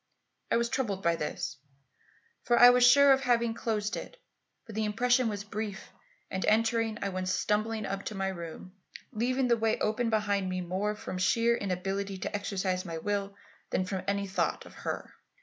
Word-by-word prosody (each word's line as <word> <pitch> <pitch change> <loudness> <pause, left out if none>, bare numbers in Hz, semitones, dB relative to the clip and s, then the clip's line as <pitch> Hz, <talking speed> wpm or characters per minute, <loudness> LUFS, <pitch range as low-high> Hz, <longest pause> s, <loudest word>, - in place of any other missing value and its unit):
I - - +3
was 235 0 +1
troubled 205 -8 -2
by 170 0 +3
this, 150 -2 -4 0.8
for 240 - +2
I 245 0 +10
was 250 0 +4
sure 280 +3 +7
of 270 - +1
having 235 -3 +2
closed 215 -1 -2
it. - - -7 0.5
But 225 - -10
the 220 +1 -1
impression 245 +3 +2
was 205 -1 -4
brief, 205 0 -6 0.4
and 190 - -2
entering, 225 0 +2
I 200 - 0
went 185 -1 -3
stumbling 215 +2 0
up 195 0 -4
to 215 - -4
my 195 0 -1
room, 170 0 -8 0.4
leaving 250 +3 0
the 235 -1 +3
way 225 0 +1
open 225 +2 0
behind 205 -3 0
me 185 0 -2
more 190 +4 -2
from 210 -4 -6
sheer 230 +5 +3
inability 195 0 -3
to - - -5
exercise 190 -2 -1
my 165 -3 -5
will 200 +3 -2 0.3
than 185 - 0
from 185 0 -3
any 200 0 0
thought 195 0 -1
of - - -13
her. - - -5
210 Hz, 185 wpm, -30 LUFS, 190-230 Hz, 0.8 s, I